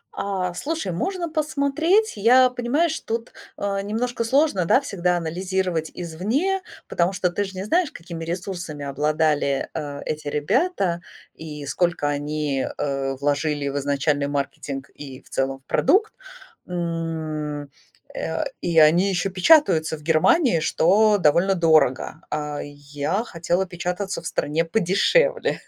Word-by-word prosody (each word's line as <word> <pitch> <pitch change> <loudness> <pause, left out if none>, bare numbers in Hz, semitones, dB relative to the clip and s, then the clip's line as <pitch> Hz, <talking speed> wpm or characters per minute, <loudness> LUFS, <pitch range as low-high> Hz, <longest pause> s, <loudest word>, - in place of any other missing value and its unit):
А, 185 -3 -2
слушай, 295 - -3
можно 350 - -2
посмотреть. 315 +6 +1
Я, 250 +5 +6
понимаешь, 290 +7 0
тут, 230 +1 -4 0.3
э, 200 -1 -1
немножко 230 +4 -2
сложно, 265 - +2
да, 255 - +5
всегда 180 -10 -1
анализировать 175 0 -2
извне, 220 - -1 0.3
потому 175 +2 +1
что 180 -2 0
ты 205 - -1
же 195 -1 -7
не 190 - -3
знаешь, 330 - +1
какими 165 -1 -8
ресурсами 175 -4 -5
обладали, 150 0 0
э, 145 -2 -5
эти 155 -1 -4
ребята, 185 - 0 0.3
и 150 -2 -8
сколько 170 +1 0
они, 145 -1 -1
э, 135 -1 -2
вложили 145 0 0
в 140 - -3
изначальный 145 +1 0
маркетинг, 140 -1 -4
и 135 -2 -10
в - - -21
целом 135 0 -1
в 135 - -39
продукт. 395 - +2 0.5
М, 160 -4 -3 0.5
э, - - -2 0.2
и 170 -2 -1
они 170 +6 +5
ещё 190 +1 -1
печатаются 180 - +4
в - - -15
Германии, 165 - +4
что 205 +7 +3
довольно 180 +3 +3
дорого. 160 -3 +2
А 150 -1 -3
я 145 +7 -3
хотела 175 0 -1
печататься 180 +1 -4
в 165 - -6
стране 160 +1 0
подешевле. 225 - +2
175 Hz, 135 wpm, -23 LUFS, 150-215 Hz, 0.5 s, Я